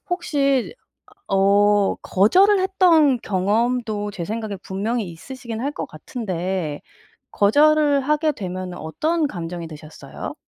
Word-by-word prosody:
혹시 285 - 0 0.6
어 200 +1 +3
거절을 375 - +3
했던 345 -8 +4
경험도 210 +2 -1
제 175 - -5
생각에 215 +1 -4
분명히 205 +1 -3
있으시기는 235 +6 -8
할 285 - -1
것 - - -5
같은데 180 - -4 0.5
거절을 290 +6 +4
하게 300 +2 +1
되면은 185 -5 -6
어떤 310 - -1
감정이 175 -6 -6
드셨어요? 155 0 -9
220 Hz, 260 characters per minute, -21 LUFS, 185-290 Hz, 0.6 s, 했던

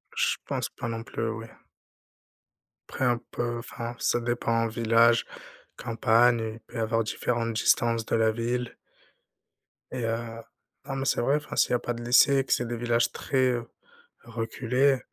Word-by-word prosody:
Je - - +2
pense - - -2
pas 120 - -6
non 115 0 -4
plus, 115 -1 -3
oui. 115 0 -6 1.4
Après - - -4
un 120 -1 +2
peu, 120 0 -2
enfin, 120 0 -6
ça 120 - +1
dépend, 115 -1 0
village, 115 +1 +3 0.5
campagne, 115 +1 +3
il 115 - -11
peut 115 +2 -11
y - - -2
avoir 115 0 +1
différentes 115 +1 -1
distances 115 +1 +2
de - - 0
la 110 -1 +3
ville 120 +2 -2 1.2
et 125 -2 -4
heu, 115 0 -3 0.4
non, 135 - -4
mais 135 - -2
c'est - - +1
vrai, 140 +5 +2
enfin, 150 - -7
s'il - - +3
y - - +2
a 125 - +3
pas 120 - -3
de 120 0 -7
lycée, 135 +3 +5
que - - -8
c'est 120 - 0
des 120 - -3
villages 120 0 +1
très, 130 -1 +1
heu, 120 -1 -3 0.5
reculés, 125 +4 0
120 Hz, 170 wpm, -27 LUFS, 115-120 Hz, 1.4 s, lycée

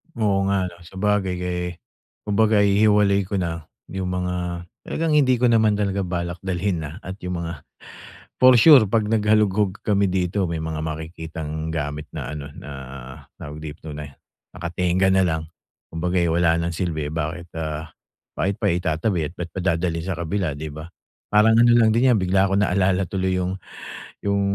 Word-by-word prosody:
Oo 100 -4 +1
nga 95 -2 +1
ano, 85 - -15
sabagay 95 0 0
kay 90 0 -3 0.6
kumbaga 105 0 +3
i-hiwalay 100 -1 +4
ko 100 - -3
na, 85 -4 -3 0.2
yung 95 -1 -3
mga 90 -1 -3 0.2
talagang 165 -1 -1
hindi 130 -4 +4
ko 125 +1 +2
naman 110 -2 +4
talaga 100 -1 -1
balak 85 0 -3
dalhin 95 -1 -1
na, 75 +6 -7
at 95 +3 -7
yung 90 -1 -3
mga 85 -2 -5 0.8
for 130 0 +8
sure 135 +1 +8
pag 110 0 +1
nag-halugog 105 -2 +2
kami 100 -1 +2
dito 95 +1 0
may 80 -1 -3
mga 80 -1 -3
makikitang 80 0 -5
gamit 75 0 -3
na - - -3
ano, 75 -1 -6
na, - - -10 0.7
tawag 75 +1 -8
dito 75 0 -8
na, 75 0 -6 0.5
naka-tengga 90 +2 +1
na 95 0 +4
lang. 80 -1 -1 0.5
Kumbaga 90 +3 -1
ay 85 - +2
wala 85 0 +3
ng 85 0 -2
silbi, 80 -4 -2
bakit 85 +2 -4
ah, 80 0 -4 0.5
bakit 100 +1 0
pa - - +2
itatabi 85 0 0
at - - -20
bakit 85 -1 -6
pa - - -2 0.2
dadalhin 85 -1 -2
sa 95 - -2
kabila 85 0 -1
di 80 +2 -6
ba, 80 +2 -8 0.4
parang 110 +2 +5
ano 120 0 +6
lang 115 -2 +5
din 125 +2 +4
yan 110 - +3
bigla 95 +1 +2
ko 95 - +2
naalala 95 -1 +2
tuloy 95 -1 0
yung, 90 +1 -1 0.7
yung 100 0 +1
90 Hz, 170 wpm, -23 LUFS, 80-100 Hz, 0.8 s, for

